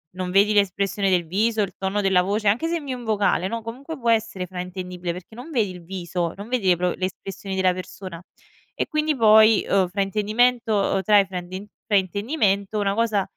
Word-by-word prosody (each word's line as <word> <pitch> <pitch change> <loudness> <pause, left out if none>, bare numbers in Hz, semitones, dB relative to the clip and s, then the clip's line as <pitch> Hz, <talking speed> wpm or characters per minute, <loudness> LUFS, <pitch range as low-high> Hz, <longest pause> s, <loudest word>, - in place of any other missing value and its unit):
non 185 -1 -4
vedi 200 +3 +4
l'espressione 200 0 +1
del 175 -3 +1
viso, 215 +5 +1
il 200 - -3
tono 195 +2 -1
della 190 -2 +3
voce, 205 +3 -1
anche 225 +11 +2
se 340 +1 0
invii 280 -5 -5
un 245 - -9
vocale, 205 -4 +1
no, 230 +3 -4
comunque 260 +8 -7
può 240 -5 -2
essere 220 -5 0
fraintendibile 180 -1 -5
perché 180 +5 -10
non 250 +8 -9
vedi 225 -8 +1
il 180 -2 -10
viso, 175 -1 -3
non 200 +2 -9
vedi 245 -6 -1
le 180 - +5
pro 180 +1 0
le 185 - -2
espressioni 195 +1 -6
della 185 -1 +2
persona 185 -1 -8 0.5
e - - -2
quindi 305 -1 0
poi, 220 -2 +6
uhm, 190 -2 +3
fraintendimento 210 +2 +1
trae 205 0 +5
frainden 185 +2 -7 0.2
fraintendimento, 200 - 0
una 200 -1 0
cosa 220 -3 +1
200 Hz, 190 wpm, -23 LUFS, 185-225 Hz, 0.5 s, poi